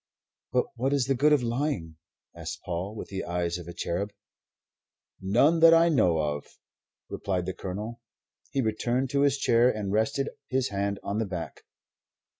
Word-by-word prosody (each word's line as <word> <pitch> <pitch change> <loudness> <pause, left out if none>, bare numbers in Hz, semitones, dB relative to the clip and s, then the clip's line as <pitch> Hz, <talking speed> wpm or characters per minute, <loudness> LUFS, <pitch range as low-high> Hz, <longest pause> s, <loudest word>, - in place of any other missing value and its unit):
"But 125 - +2
what 135 +4 +1
is 140 -3 +2
the 135 - +2
good 145 +4 +3
of 145 -4 +4
lying?" 115 - -2 0.4
asked - - -6
Paul, 90 +5 -4
with - - -7
the 95 -1 -4
eyes 85 0 -2
of 85 - -10
a - - -6
cherub. 100 +6 -2 1.1
"None 125 - +3
that 165 0 +8
I 165 +1 +5
know 90 - +3
of," 75 -2 -2 0.6
replied 90 -3 -2
the 95 - -3
Colonel. 105 +6 -6 0.5
He 135 - 0
returned 120 +3 0
to 140 -1 +2
his 140 -1 +3
chair 120 -2 +4
and 105 -5 -2
rested 135 +6 +1 0.2
his 130 0 0
hand 100 0 -2
on 100 +2 -2
the 110 - -1
back. 90 -3 -6
110 Hz, 170 wpm, -27 LUFS, 95-135 Hz, 1.1 s, that